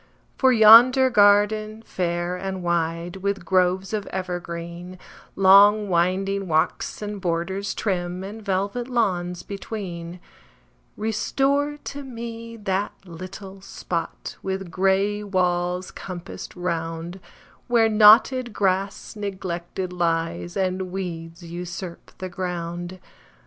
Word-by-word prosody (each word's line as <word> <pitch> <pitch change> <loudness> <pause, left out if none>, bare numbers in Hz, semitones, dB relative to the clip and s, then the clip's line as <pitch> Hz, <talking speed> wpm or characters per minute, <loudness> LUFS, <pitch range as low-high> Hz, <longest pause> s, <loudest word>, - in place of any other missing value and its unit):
For 260 -1 +4
yonder 245 +3 +8
garden, 215 +1 +3
fair 175 -2 -2
and 190 0 -5
wide, 170 +1 -1
With 200 -1 -2
groves 185 +2 +1
of 210 -2 -2
evergreen, 175 -1 -5 0.4
Long 200 +2 +6
winding 190 +3 +1
walks, 160 +5 0
and 205 -1 -5
borders 185 +3 -2
trim, 180 -2 -2
And 210 +3 -8
velvet 200 +5 -1
lawns 180 -8 -1
between; 180 -4 -6 0.8
Restore 275 +7 0
to 285 0 -6
me 230 -2 -7
that 200 -1 -2
little 190 +3 -9
spot, 170 -3 -5
With 190 -2 -4
gray 195 +3 +1
walls 180 -2 -1
compassed 185 -1 -8
round, 170 0 -4 0.5
Where 235 -2 +4
knotted 220 +3 +6
grass 195 +2 -1
neglected 185 -2 -4
lies, 170 +1 -1
And 185 -1 -1
weeds 170 -2 -6
usurp 175 +1 -7
the 185 - -5
ground. 175 0 -5
190 Hz, 105 wpm, -24 LUFS, 175-210 Hz, 0.8 s, yonder